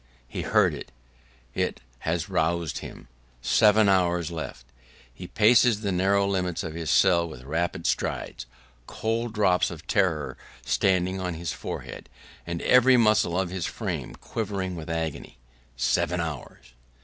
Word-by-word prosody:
He - - -5
heard - - +3
it; - - -8 0.6
it - - -1 0.2
has 80 +1 -2
roused 85 -4 0
him. - - -10 0.4
Seven 105 - +5
hours 90 -3 +2
left! 80 -7 -6 0.5
He 90 +7 -9
paces 115 +1 +4
the 100 -2 -1
narrow 100 +2 +2
limits 90 -3 -1
of 80 - -5
his 80 -1 -4
cell 85 -3 +4
with 65 -5 -10
rapid 80 +6 -2
strides, - - -2 0.4
cold 115 +1 -2
drops 95 -4 +3
of 85 -1 -9
terror 85 -8 0 0.3
starting 95 0 +1
on 90 -2 -3
his 85 -1 -4
forehead, - - -7 0.4
and 85 -1 -4
every 125 0 +6
muscle 110 -6 +3
of 95 -2 -2
his 95 -2 -3
frame - - -4
quivering 100 -4 -4
with 80 -1 -8
agony. 80 -2 -4 0.4
Seven 85 +7 +1
hours! 75 -7 -6
90 Hz, 140 wpm, -26 LUFS, 80-100 Hz, 0.6 s, every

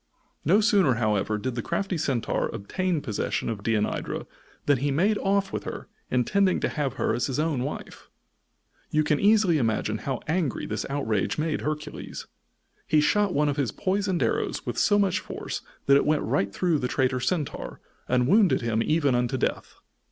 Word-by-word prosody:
No 195 +8 +4
sooner, 200 - +4
however, 105 -2 0
did 125 +4 -3
the 120 - -3
crafty 190 - -2
Centaur 135 -7 0
obtain 180 - -2
possession 110 0 -2
of 110 -3 -4
Deianira 105 0 -1 0.4
than 145 -3 +3
he 145 +3 0
made 195 +10 +2
off 195 0 0
with - - -3
her, - - -6 0.2
intending 185 - +2
to - - +1
have 140 -4 -2
her 135 - 0
as 120 - 0
his 130 - -2
own 150 -4 0
wife. 140 - -6 0.8
You 155 0 +2
can 150 -1 +1
easily 200 -6 +4
imagine 110 -2 0
how 135 -3 -3
angry 160 -4 -1
this - - -3
outrage 125 -8 -1
made 155 0 -1
Hercules. 150 0 -5 0.6
He 155 - +4
shot 205 +7 +2
one 150 +1 +3
of 145 0 -1
his 135 -7 0
poisoned 195 -2 0
arrows - - -1
with - - -2
so 205 - +4
much 190 -2 +2
force - - -6 0.2
that 140 0 +6
it - - +1
went 155 0 +2
right 100 0 0
through 170 - +1
the 125 - -1
traitor 130 0 +1
Centaur, 145 +4 -3 0.3
and 125 0 +2
wounded 200 +3 +4
him 115 -1 0
even 155 -2 +2
unto 125 +2 0
death. - - -2
145 Hz, 180 wpm, -26 LUFS, 125-185 Hz, 0.8 s, that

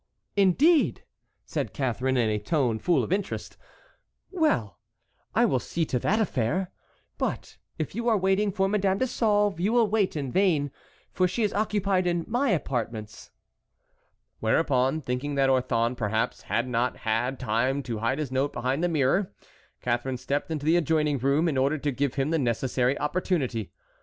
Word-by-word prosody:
"Indeed!" 265 - +3 0.4
said - - -3
Catharine, 130 -1 0
in 120 -3 +2
a 105 -1 0
tone 125 -6 0
full 165 -4 +2
of - - -1
interest; 200 0 -3 0.8
"well, 130 - 0 0.6
I - - +5
will 130 - +2
see 165 +6 -2
to 125 - -1
that 210 - +1
affair. 180 - 0 0.5
But - - -3 0.2
if 155 - -3
you 235 +3 -1
are 220 - +4
waiting 195 +2 +1
for 195 0 +1
Madame 195 -1 +1
de 260 - +1
Sauve 205 -6 +1
you 195 +5 +1
will 235 -2 +4
wait 205 -4 +1
in 140 -4 -3
vain, 160 -7 +2 0.4
for 185 0 +2
she 225 +6 -1
is 210 - 0
occupied 200 -3 +1
in 175 -1 0
my 245 +4 +1
apartments." 115 - -3 1.1
Whereupon, 130 +4 +1
thinking 130 +2 -3
that 135 -1 +3
Orthon 120 -2 +1
perhaps 110 +1 -1
had 120 +2 0
not 125 0 0
had 120 +4 0
time 125 +4 0
to 115 -4 -4
hide 115 +5 0
his 150 -4 -3
note 135 +2 0
behind 130 +6 -1
the 175 - +2
mirror, 165 +5 +1 0.5
Catharine 125 +2 -1
stepped 140 +5 -2
into 150 -3 -3
the 165 +2 +4
adjoining 150 -3 +1
room 140 +6 +2
in 140 -5 0
order 140 +4 +2
to 145 0 -1
give 135 0 -1
him 135 +3 0
the 165 - +2
necessary 125 +1 0
opportunity. 150 - -1
145 Hz, 165 wpm, -26 LUFS, 125-190 Hz, 1.1 s, I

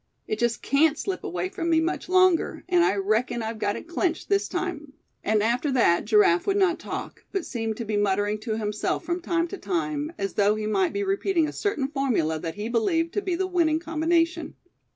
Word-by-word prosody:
It 215 - -2
just 240 -1 0
can't 300 +2 +3
slip 380 -2 -3
away 180 +1 -3
from 335 - -3
me 325 -1 +4
much 340 +2 -2
longer; 370 -2 +3
and 355 -2 +4
I 205 - +2
reckon 215 +4 0
I've 220 0 -4
got 205 0 0
it 235 - -8
clinched 340 -1 -1
this 400 -1 +2
time," 355 -6 -4 0.3
and 215 0 +2
after 245 +6 +1
that 175 -9 +3
Giraffe 210 -5 +4
would 395 0 +2
not 370 -3 +2
talk, - - -6
but 390 -4 -2
seemed 225 -3 -3
to 235 - -4
be 210 -1 -1
muttering 205 +1 +1
to 220 0 -3
himself 210 -1 -2
from 345 +1 -2
time 340 0 0
to 395 - -7
time, 310 -4 -2
as 195 0 -3
though 205 +1 +3
he 215 0 -3
might 335 - +1
be 405 - -2
repeating 385 -4 +1
a - - -6
certain 350 -10 -1
formula 245 - 0
that 165 0 -5
he 210 +2 -4
believed 325 - 0
to 410 - 0
be 370 -3 -1
the 380 +2 0
winning 340 -4 +2
combination. 330 0 0
300 Hz, 215 wpm, -25 LUFS, 215-345 Hz, 0.3 s, me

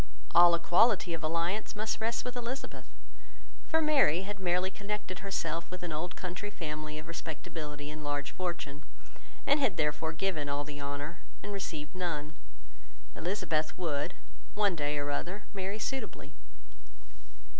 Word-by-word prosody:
All 175 0 +9
equality 175 +2 +5
of 165 - -2
alliance 170 +8 0
must 215 +1 -1
rest 230 +2 +1
with 250 0 -3
Elizabeth, 245 +2 -4 0.8
for 320 -1 +4
Mary 275 - +5
had 200 +1 -4
merely 180 0 +2
connected 200 -3 -3
herself 170 -4 -1
with 180 0 -6
an 175 - -2
old 175 +4 -2
country 185 +3 -4
family 155 -4 -4
of 155 +1 -7
respectability 150 -2 -5
and 155 0 -6
large 145 -1 -1
fortune, 170 -5 -3 0.6
and 285 +1 +5
had 220 -11 +3
therefore 155 +1 +1
given 160 -4 0
all 140 +1 0
the 145 0 -6
honour 145 +4 -3 0.2
and 205 - -3
received 155 -6 -3
none: 165 -4 -2 0.8
Elizabeth 160 -4 0
would, 165 -1 0 0.4
one 205 -3 +4
day 150 -1 0
or 145 0 0
other, 185 +8 -2
marry 195 +1 -2
suitably. 265 +5 -3
170 Hz, 145 wpm, -32 LUFS, 150-200 Hz, 0.8 s, All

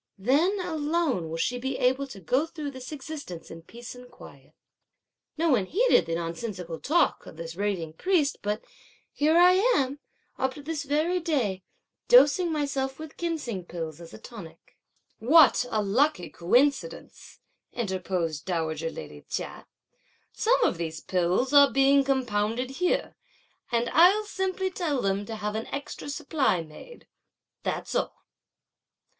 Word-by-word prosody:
Then 295 - +2
alone 310 - -1
will 165 - -4
she 245 +9 -1
be 265 +1 -3
able 260 +2 +1
to 210 -7 -10
go 255 - 0
through 305 -3 -6
this 260 0 -9
existence 285 - -8
in 165 - -9
peace 235 +8 -10
and 250 0 -12
in - - -18
quiet.' - - -15 0.8
No 330 +1 +1
one 210 -8 +2
heeded 450 - +3
the 165 - -1
nonsensical 170 0 -5
talk 340 +4 +1
of - - -11
this 165 0 -7
raving 185 -5 -2
priest; 315 - +1
but 210 +1 -3 0.5
here 310 +3 +3
am 360 - +4 0.4
I, - - -3
up 265 0 0
to 290 - -10
this 300 -1 -4
very 310 +6 +1
day, 260 - -1 0.5
dosing 360 -7 +6
myself 275 -3 -2
with 315 -1 -9
ginseng 305 - -3
pills 165 -2 -6
as 165 - -11
a - - -10
tonic." 210 -7 -12 0.4
"What 270 0 +5
a 215 -3 0
lucky 210 - +1
coincidence!" 270 - 0 0.3
interposed 185 -7 -2
dowager 165 -3 -2
lady 75 - -9
Chia; - - -5 0.7
"some - - +2
of - - +1
these 160 -1 -4
pills 185 +9 0
are 285 -1 +8
being 275 +1 +4
compounded 250 -2 0
here, 355 +6 0 0.6
and 235 0 +1
I'll 370 +6 +6
simply 380 -2 -2
tell 320 -7 -1
them 200 -1 -1
to 225 - -5
have 210 -1 -3
an 220 +1 -4
extra 285 0 -6
supply 285 - 0
made; 165 - -13 0.6
that's - - -3
all." - - -2
260 Hz, 150 wpm, -27 LUFS, 190-305 Hz, 0.8 s, are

